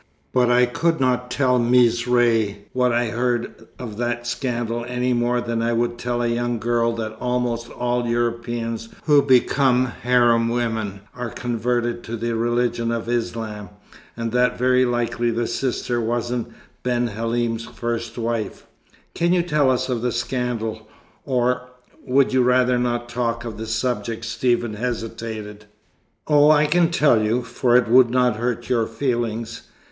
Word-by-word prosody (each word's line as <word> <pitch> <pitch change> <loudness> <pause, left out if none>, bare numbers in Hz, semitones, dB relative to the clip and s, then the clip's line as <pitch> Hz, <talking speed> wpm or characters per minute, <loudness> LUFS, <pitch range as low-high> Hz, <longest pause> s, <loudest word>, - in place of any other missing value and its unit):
But 125 -1 +3
I 125 0 +5
could 165 +7 0
not 125 -1 +1
tell 125 -1 +2
Mees 120 -1 +3
Ray 115 -4 +2
what 125 -1 +2
I 120 +1 +2
had 115 - -4
heard 120 0 -2
of 110 -4 -7
that 120 0 -2
scandal 120 -2 -2
any 125 +1 0
more 120 0 +1
than 115 -1 -2
I 115 +1 0
would 120 +1 -1
tell 120 0 -1
a - - +1
young 120 0 -1
girl 115 +1 +1
that 110 -1 -4
almost 125 -1 -1
all 120 0 -1
Europeans 115 -1 -2
who 145 -2 +5
become 130 -1 +3
harem 120 -2 +2
women 110 -4 -2
are 125 -1 -4
converted 120 +1 -2
to 115 +1 -4
the 115 +1 -2
religion 120 0 0
of 115 -1 -3
Islam, 115 -4 -3 0.5
and 115 -1 -3
that 125 +1 +2
very 125 +1 +3
likely 120 -1 0
the 115 +1 -1
sister 120 0 -2
wasn't 120 +1 -2 0.3
Ben 120 -1 0
Halim's 115 +1 -2
first 120 0 -4
wife." 115 -2 -3 0.5
"Can 170 +1 +1
you 175 -1 +2
tell 150 -5 +2
us 130 -1 +1
of 125 -3 -2
the 125 0 0
scandal, 115 -4 -3 0.4
or 125 -1 0 0.3
would 135 +1 +2
you 130 - +4
rather 125 0 +3
not 120 -1 -1
talk 120 -1 -2
of 110 -2 -6
the 110 - -5
subject?" 115 0 -2
Stephen 120 0 0
hesitated. 110 -2 -5 0.6
"Oh, 150 0 +5
I 150 0 +5
can 165 +2 +3
tell 145 -9 +3
you, 115 +4 0
for 120 +1 +2
it 125 - +2
would 125 +1 +6
not 125 -2 +2
hurt 120 0 -2
your 115 -3 +1
feelings. 115 -2 -3
120 Hz, 160 wpm, -22 LUFS, 115-125 Hz, 0.6 s, would